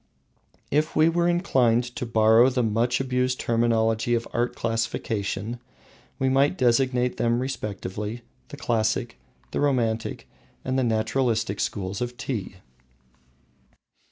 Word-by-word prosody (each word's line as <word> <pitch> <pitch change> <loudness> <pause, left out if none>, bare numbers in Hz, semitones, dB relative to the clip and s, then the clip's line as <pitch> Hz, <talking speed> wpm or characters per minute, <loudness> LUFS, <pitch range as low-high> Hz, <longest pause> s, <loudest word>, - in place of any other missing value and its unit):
If 150 +2 +1
we 155 +1 +5
were 170 +1 +1
inclined 130 -10 +2
to 130 -4 -4
borrow 115 +2 +5
the 125 -1 0
much 115 +3 +1
abused 125 -1 0
terminology 115 0 +1
of 115 - -2
art 120 +1 0
classification, 115 -1 -2 0.6
we 135 - 0
might 140 +6 +3
designate 125 -1 +2
them 120 +1 +1
respectively, 105 -2 -4 0.2
the - - -10
Classic, 115 - -1 0.3
the - - -2
Romantic, 120 -6 0 0.4
and 130 0 0
the - - +1
Naturalistic 110 -2 0
schools 100 +2 -3
of 120 0 -4
Tea. 105 -8 -4
120 Hz, 120 wpm, -25 LUFS, 110-130 Hz, 0.6 s, we